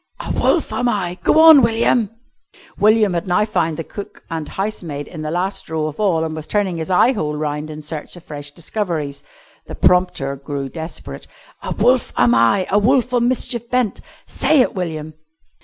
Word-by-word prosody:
"'A - - -4
wolf - - +1
am 245 - +1
I' 180 -4 -2
go 310 - +3
on, 320 -3 +9
William!" 230 -1 +2 0.7
William 215 -2 +4
had 170 +2 -2
now 180 +4 +2
found 165 -7 -1
the 165 - -3
cook 200 +5 -9
and 160 -2 -4
housemaid 175 -8 -4
in 160 - -8
the 155 - -3
last 180 +4 -2
row 160 -1 -1
of 155 +3 -6
all 180 -6 +2
and 160 -1 -3
was 155 -1 -7
turning 200 -5 0
his 160 +2 -4
eye 190 +7 +4
hole 150 -8 -2
round 150 0 -3
in 155 0 -8
search 150 +2 -6
of 175 - -13
fresh 145 -1 -7
discoveries. 155 -3 -4 0.5
The - - -7
prompter 180 -7 +2
grew 140 0 -5
desperate. 160 +3 -8 0.3
"'A - - -4
wolf 245 +4 +2
am 120 -1 +4
I 115 +12 +3
a 205 - +4
wolf 250 +3 +2
on 240 -1 +3
mischief 235 -2 -1
bent.' 250 -5 0 0.2
Say 305 -4 +2
it, - - +1
William." 160 -4 -4
175 Hz, 190 wpm, -19 LUFS, 155-215 Hz, 0.7 s, on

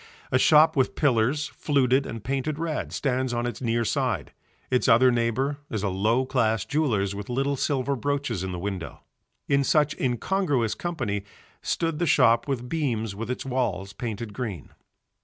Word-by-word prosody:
A 130 - +3
shop 155 +3 +6
with 130 -2 +1
pillars, 140 +1 +2
fluted 135 -2 +1
and 115 -2 -7
painted 140 +4 -2
red, 160 -1 -3
stands 130 -2 -1
on 120 0 -1
its 120 -1 -4
near 115 -1 0
side, - - -1 0.4
its 125 - +2
other 125 +3 +6
neighbour 125 +5 0
is 110 -3 -3
a 100 - +1
low 110 +7 +1
class 115 -6 +1
jeweller's 115 -10 0
with 100 +2 -7
little 135 +3 0
silver 140 0 0
brooches 140 -6 -2
in 95 - -3
the 90 - -4
window. 95 -2 -5 0.5
In 140 -1 +3
such 150 +1 +2
incongruous 130 - 0
company 120 - -3 0.4
stood 165 -2 -1
the 175 - +1
shop 120 -4 +4
with 125 -3 -2
beams 120 -9 -1
with 115 +4 -6
its 125 - -3
walls 125 -7 -2
painted 110 -2 -5
green. 105 - -5
125 Hz, 165 wpm, -26 LUFS, 115-140 Hz, 0.5 s, shop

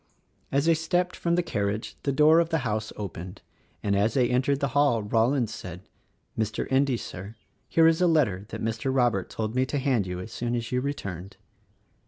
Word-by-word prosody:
As 140 +2 +2
they 165 - +5
stepped 175 +3 0
from 170 0 0
the 175 - +1
carriage 105 -7 -2
the 140 - 0
door 155 +4 +5
of 170 -1 +1
the 160 -6 -1
house 110 0 -2
opened; 95 -1 -7 0.4
and 100 -1 +1
as 105 +5 +1
they 125 -2 +2
entered 135 +2 +1
the 140 - 0
hall 135 -4 +2
Rollins 115 +3 +1
said, 90 0 -8 0.5
"Mr. 110 -1 -1
Endy, 135 -1 +3
Sir, 100 +1 -8 0.3
here 165 - +4
is 165 +1 +4
a 180 - +5
letter 110 - +1
that - - -6
Mr. 115 +4 -1
Robert 120 -8 +1
told 110 0 -3
me 130 +1 +2
to 145 - -2
hand 130 -8 +1
you 90 0 -4
as 90 +5 -8
soon 120 0 -2
as 115 -1 -4
you 125 0 +1
returned." 100 - -5
120 Hz, 200 wpm, -26 LUFS, 105-140 Hz, 0.5 s, they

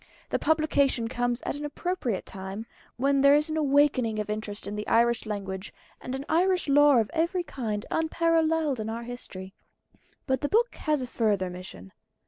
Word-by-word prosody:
The - - 0
publication 285 -6 +2
comes 245 0 -1
at - - -2
an 295 - -6
appropriate 295 - -2
time, 195 +3 -7 0.3
when 275 +2 +2
there 280 +1 +7
is 300 +2 +1
an - - -1
awakening 280 -6 +2
of 210 0 -2
interest 210 -1 -5
in 205 - -4
the 210 0 -5
Irish 235 0 +2
language, 195 -2 -5 0.3
and 255 - -4
in 270 +1 -5
Irish 360 +2 +2
lore 285 -3 +6
of 215 - -5
every 340 +3 0
kind, 220 -9 -4
unparalleled 320 -3 +1
in 215 0 -3
our 230 +1 -4
history. 195 -6 -8 0.7
But 265 -2 0
the 290 - -1
book 475 +3 +2
has 300 -4 -1
a - - -5
further 205 -6 0
mission. 95 - -10
255 Hz, 175 wpm, -27 LUFS, 215-300 Hz, 0.7 s, there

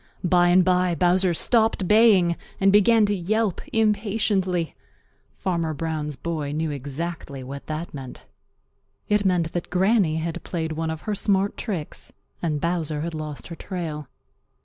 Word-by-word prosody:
By 175 0 +4
and 180 +1 +5
by 180 -1 +2
Bowser 180 +1 +3
stopped 220 -2 +2
baying 210 -5 +5 0.2
and 195 0 +4
began 215 +2 +5
to 205 - +1
yelp 205 +2 0
impatiently. 205 -5 +1 0.6
Farmer 170 -4 -1
Brown's 150 -1 -3
boy 155 -2 -3
knew 155 0 -1
exactly 145 0 -5
what 140 +2 -8
that 155 +2 -5
meant. 130 - -9 0.8
It 210 -1 +2
meant 175 -3 +1
that 175 - -4
Granny 190 -2 +2
had 165 0 -3
played 160 -2 -3
one 160 +1 -2
of 160 -1 -4
her 215 - -3
smart 200 0 +1
tricks 180 -10 -5 0.3
and 155 -4 -1
Bowser 165 -2 -1
had 170 +1 -4
lost 155 -1 -6
her 170 - -6
trail. 160 -6 -5
175 Hz, 150 wpm, -24 LUFS, 155-195 Hz, 0.8 s, and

